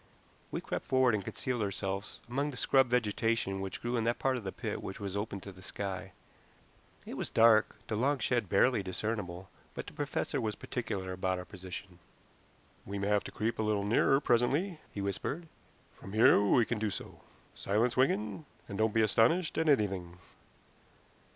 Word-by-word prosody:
We - - -3
crept - - -4
forward 130 -2 +4
and 105 -2 0
concealed 125 +4 -3
ourselves 100 0 -3
among 140 +5 -1
the 135 - -7
scrub 135 0 +4
vegetation 115 -4 0
which 95 -1 -5
grew 120 +1 0
in 115 - +1
that 120 +1 +1
part 135 -1 +1
of 125 - -4
the 95 - -3
pit - - -4
which 95 - -6
was 100 -2 -4
open 100 -1 -3
to 100 - -8
the 95 -1 -15
sky. 95 0 -5 0.9
It - - -6
was - - -2
dark, 110 -1 +5
the 110 - -2
long 140 +6 +2
shed 120 -6 0
barely 105 +3 +4
discernible, 95 -1 -4 0.3
but - - -5
the - - -10
professor - - -2
was 110 -2 -1
particular 100 -6 -4
about 95 0 -1
our 90 - -6
position. 95 -1 -9 0.8
"We 100 - -5
may 100 +1 -1
have 105 -1 +3
to - - -6
creep 110 +2 -2
a - - +3
little 105 -2 +1
nearer 120 +5 +4
presently," 145 +8 +1
he 100 - -5
whispered. 100 - -3 0.5
"From 95 - -11
here 110 -2 +6
we 110 +3 +4
can 120 -1 -2
do 110 0 0
so. - - -7 0.3
Silence, 110 +5 +1
Wigan, 125 +1 +1 0.2
and 100 0 -6
don't 110 0 +2
be 110 - +5
astonished 125 - +3
at 160 -1 +2
anything." 95 -9 +1
110 Hz, 185 wpm, -32 LUFS, 100-120 Hz, 0.9 s, here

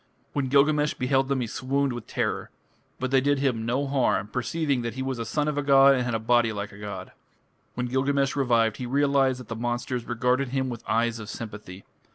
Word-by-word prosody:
When 140 -2 0
Gilgamesh 150 +2 +3
beheld 135 +1 +1
them 135 -2 0
he - - -1
swooned 135 +4 -1
with 120 -2 -7
terror. - - -2 0.5
But 130 0 -2
they 135 -1 +4
did 145 +1 +2
him 125 -5 0
no 130 +4 0
harm, 130 -7 +1
perceiving 140 +3 -1
that 115 -1 -4
he 130 - -3
was 130 -2 -3
a 115 - -3
son 150 +7 -1
of 150 -1 0
a - - +1
god 140 -1 +6
and 130 -2 +1
had 120 -2 -1
a - - 0
body 115 0 +3
like 105 -1 -5
a 100 - -13
god. 100 -2 -7 0.6
When 125 - -2
Gilgamesh 135 +2 +1
revived, 115 -5 +2
he 125 - -5
realized 135 -1 +2
that 125 - -10
the 115 - -5
monsters 120 +1 -3
regarded 125 +3 0
him 130 +1 -1
with 120 -2 -6
eyes 115 +1 +1
of 110 -1 -8
sympathy. 105 -5 -8
125 Hz, 215 wpm, -26 LUFS, 115-140 Hz, 0.6 s, god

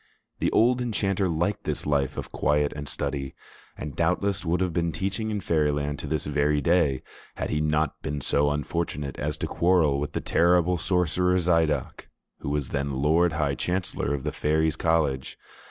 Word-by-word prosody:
The - - +1
old 125 +2 +3
enchanter 100 -5 0
liked 85 +5 -1
this - - -2
life 70 -3 0
of - - -5
quiet 75 0 +1
and 75 -1 -6
study, 70 -2 -3 0.4
and 75 -4 -6
doubtless 100 -1 0
would 85 0 0
have 90 -2 0
been 85 -1 0
teaching 100 +6 -2
in 105 -2 -2
Fairyland 75 -3 0
to - - -6
this 80 -2 -2
very 75 0 +1
day, 75 -3 +2 0.3
had - - -3
he 75 - 0
not 75 -1 0
been 75 -2 -3
so 70 +1 +2
unfortunate 75 -1 -3
as 75 +1 -2
to - - -2
quarrel 85 -5 +2
with 75 0 -4
the - - -1
terrible 90 0 +3
sorcerer 90 +1 +2
Zidoc, 80 -6 0 0.3
who - - -4
was 75 -2 -1
then 70 0 -2
Lord 80 +5 +3
High 75 -3 0
Chancellor 90 +1 -2
of 70 - -6
the - - -2
Fairies' 80 +1 +1
College. 80 -5 0
80 Hz, 175 wpm, -26 LUFS, 75-90 Hz, 0.4 s, old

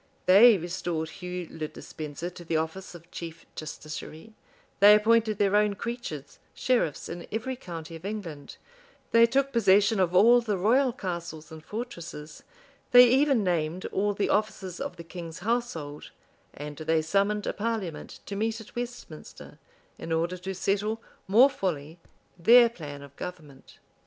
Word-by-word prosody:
They 205 +4 +8
restored 170 -2 -3
Hugh 180 -1 -6
le 155 -1 -4
Despenser 155 +3 -7
to 175 - -11
the 165 -1 -1
office 160 +4 -4
of 170 +1 -14
chief 165 -1 -8
justiciary: 155 +5 -8 0.5
they 205 +1 +9
appointed 220 0 +3
their 205 -1 +2
own 210 -1 +3
creatures 235 - -6 0.2
sheriffs 240 - 0
in 170 0 -7
every 245 +4 -3
county 165 -8 -8
of 165 - -11
England; 185 -8 -6 0.5
they 230 0 +6
took 275 +3 0
possession 205 -1 +4
of 180 -1 +1
all 235 +6 +7
the 215 -4 -1
royal 245 +8 +3
castles 170 -6 -6
and 160 -1 -10
fortresses; 170 -8 -7 0.5
they 245 -1 +9
even 265 -2 +3
named 175 -1 -1
all 205 +1 0
the 205 - 0
officers 200 -4 -1
of - - -4
the 170 - -9
king's 165 -1 -8
household; 210 -12 -3 0.4
and 145 0 -8
they 160 +1 0
summoned 200 +5 +1
a - - -1
parliament 210 -7 -4
to 200 - -6
meet 220 +2 -1
at 220 - -13
Westminster, 240 -10 -8 0.4
in 165 - -6
order 170 +3 0
to 190 +1 -6
settle 205 +4 -1 0.3
more 225 +8 +7
fully 170 - -4 0.4
their 235 +7 +7
plan 145 -9 -9
of 140 0 -14
government. 155 -6 -9
185 Hz, 150 wpm, -27 LUFS, 160-220 Hz, 0.5 s, they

